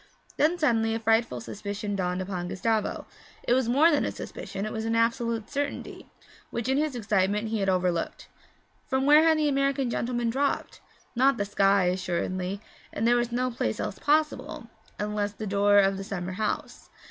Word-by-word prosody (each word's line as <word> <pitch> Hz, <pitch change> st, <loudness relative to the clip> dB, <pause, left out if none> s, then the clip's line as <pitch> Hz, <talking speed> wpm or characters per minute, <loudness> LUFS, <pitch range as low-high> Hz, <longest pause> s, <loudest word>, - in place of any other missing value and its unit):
Then 320 Hz, +4 st, +2 dB
suddenly 225 Hz, -8 st, +2 dB
a -, -, -2 dB
frightful 225 Hz, +1 st, +1 dB
suspicion 205 Hz, -1 st, -5 dB
dawned 180 Hz, -1 st, -1 dB
upon 180 Hz, -2 st, -4 dB
Gustavo 215 Hz, +3 st, -1 dB, 0.4 s
it -, -, +2 dB
was 255 Hz, -2 st, +2 dB
more 295 Hz, +7 st, +5 dB
than 295 Hz, -, +2 dB
a -, -, -1 dB
suspicion; 195 Hz, +2 st, -6 dB
it 215 Hz, -, -4 dB
was 220 Hz, -, -3 dB
an 225 Hz, 0 st, 0 dB
absolute 230 Hz, -1 st, 0 dB
certainty 285 Hz, 0 st, -4 dB, 0.4 s
which 235 Hz, 0 st, -3 dB
in 265 Hz, +2 st, +2 dB
his 300 Hz, -3 st, -1 dB
excitement 210 Hz, -1 st, 0 dB
he 220 Hz, -1 st, -1 dB
had 195 Hz, -1 st, +1 dB
overlooked. 180 Hz, -2 st, -1 dB, 0.6 s
From 265 Hz, -1 st, 0 dB
where 295 Hz, +2 st, +7 dB
had 325 Hz, -1 st, +4 dB
the 305 Hz, -1 st, +2 dB
American 275 Hz, -2 st, +1 dB
gentleman 240 Hz, -1 st, -1 dB
dropped? 275 Hz, +3 st, -1 dB, 0.3 s
Not 265 Hz, +3 st, +4 dB
the 200 Hz, -, -1 dB
sky, 200 Hz, -1 st, +3 dB
assuredly, 185 Hz, +1 st, -2 dB, 0.3 s
and 220 Hz, -, -2 dB
there 240 Hz, -, +5 dB
was 240 Hz, 0 st, 0 dB
no 250 Hz, +1 st, 0 dB
place 110 Hz, -, -2 dB
else -, -, -4 dB
possible, 305 Hz, +1 st, 0 dB, 0.3 s
unless 210 Hz, 0 st, -2 dB
the 215 Hz, -, -6 dB
door 205 Hz, 0 st, +3 dB
of 195 Hz, -1 st, +4 dB
the 195 Hz, -, -5 dB
summer 185 Hz, -3 st, -4 dB
house. 210 Hz, +3 st, -4 dB
225 Hz, 180 wpm, -27 LUFS, 195-255 Hz, 0.6 s, where